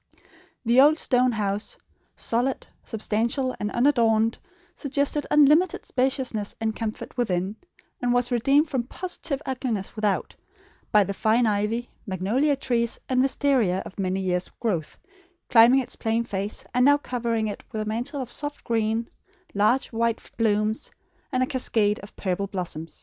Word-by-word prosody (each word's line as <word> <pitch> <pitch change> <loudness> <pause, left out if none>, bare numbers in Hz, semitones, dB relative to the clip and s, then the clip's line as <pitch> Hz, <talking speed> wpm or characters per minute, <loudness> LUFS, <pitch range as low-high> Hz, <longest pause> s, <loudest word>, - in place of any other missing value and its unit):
The 240 +3 +6
old 300 +3 +6
stone 250 -4 +2
house, 205 -1 -2 0.4
solid, 245 +3 -1 0.2
substantial, 230 +4 -1
and 210 - -2
unadorned, 230 -3 +2 0.3
suggested 285 0 -1
unlimited 300 +4 +4
spaciousness 255 -5 -1
and 220 -1 -1
comfort 220 -1 -5
within; 190 -4 0 0.5
and 245 0 +1
was 245 0 +1
redeemed 275 +6 +3
from 260 -5 -2
positive 330 -5 -4
ugliness 250 -7 -3
without, 210 -2 -1 0.6
by 210 -1 +6
the 200 - -3
fine 225 +4 +2
ivy, 215 +3 0 0.2
magnolia 215 - +1
trees, 235 -4 -1
and 255 -1 +2
wistaria, 260 -8 +2
of 200 - -10
many 190 0 0
years' 180 -1 -1
growth, 185 -10 -2 0.5
climbing 245 +3 +7
its 250 - -7
plain 225 +1 0
face, 200 -2 -5
and 250 0 +3
now 285 +2 +6
covering 235 -5 -2
it 205 - -6
with 215 -2 -2
a - - -7
mantle 245 +6 -3
of 240 - -10
soft 290 +2 -5
green, 225 0 0 0.5
large 215 +6 +2
white 230 0 -1
blooms, 215 -1 0 0.4
and 255 -1 +2
a - - +2
cascade 225 -6 0
of 200 - -12
purple 195 +1 -2
blossom. 175 -4 -5
230 Hz, 145 wpm, -25 LUFS, 210-260 Hz, 0.6 s, climbing